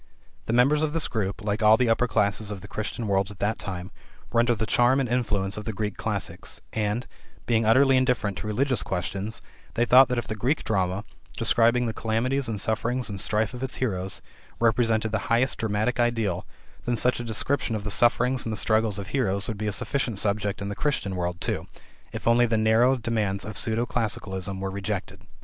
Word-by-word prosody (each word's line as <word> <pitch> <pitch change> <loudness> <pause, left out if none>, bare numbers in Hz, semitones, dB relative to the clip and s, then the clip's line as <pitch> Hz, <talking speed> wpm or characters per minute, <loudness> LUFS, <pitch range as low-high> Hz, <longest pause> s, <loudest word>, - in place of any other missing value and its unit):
The 115 - 0
members 135 +5 +4
of 155 -1 0
this 165 - -1
group, 105 -2 -3
like 105 +1 -1
all 110 +1 +6
the 125 - +2
upper 115 +2 +2
classes 105 -1 +1
of 100 -2 -5
the 95 - -10
Christian 110 +2 -4
world 95 -1 +1
at 100 - -10
that 105 +3 -1
time, 90 0 -5 0.4
were 115 - +2
under 120 0 +3
the 110 +1 -2
charm 120 +4 +3
and 135 - 0
influence 105 -5 0
of 105 - -6
the 110 - -3
Greek 105 0 -3
classics, - - -4
and, 110 +2 -1 0.4
being 115 -2 +2
utterly 130 +3 +5
indifferent 125 -6 +1
to 105 - -5
religious 130 +4 0
questions, 95 +3 -4 0.3
they 120 - +2
thought 130 +2 +7
that 125 - -1
if 120 - -2
the 110 - -3
Greek 125 +9 0
drama, 95 -1 0 0.3
describing 120 +1 +3
the 115 - -2
calamities 120 +4 0
and 105 -3 -3
sufferings 115 +3 -1
and 100 -1 -4
strife 110 +2 0
of 125 - -7
its 130 -1 -3
heroes, 95 -6 -2 0.4
represented 115 -1 +2
the 110 - 0
highest 120 +2 +2
dramatic 110 +3 0
ideal, 115 -7 0 0.4
then 120 - +1
such 125 +2 +1
a - - -3
description 115 +2 -1
of 105 - -4
the 105 - -3
sufferings 120 +3 +3
and 115 - -3
the 110 - -2
struggles 110 -2 +2
of 100 0 -6
heroes 100 -7 0
would 110 - -3
be 105 - -2
a - - 0
sufficient 120 +1 -1
subject 100 0 0
in - - -4
the 100 - -4
Christian 100 -10 -1
world, 90 -1 -2
too, - - -2 0.4
if - - -6
only 120 +1 +5
the 110 -1 +1
narrow 110 +4 +4
demands 110 -4 -1
of 110 - -7
pseudo 115 +3 0
classicalism 100 -5 -3
were 95 0 -3
rejected. 100 0 -4
110 Hz, 210 wpm, -26 LUFS, 100-120 Hz, 0.4 s, thought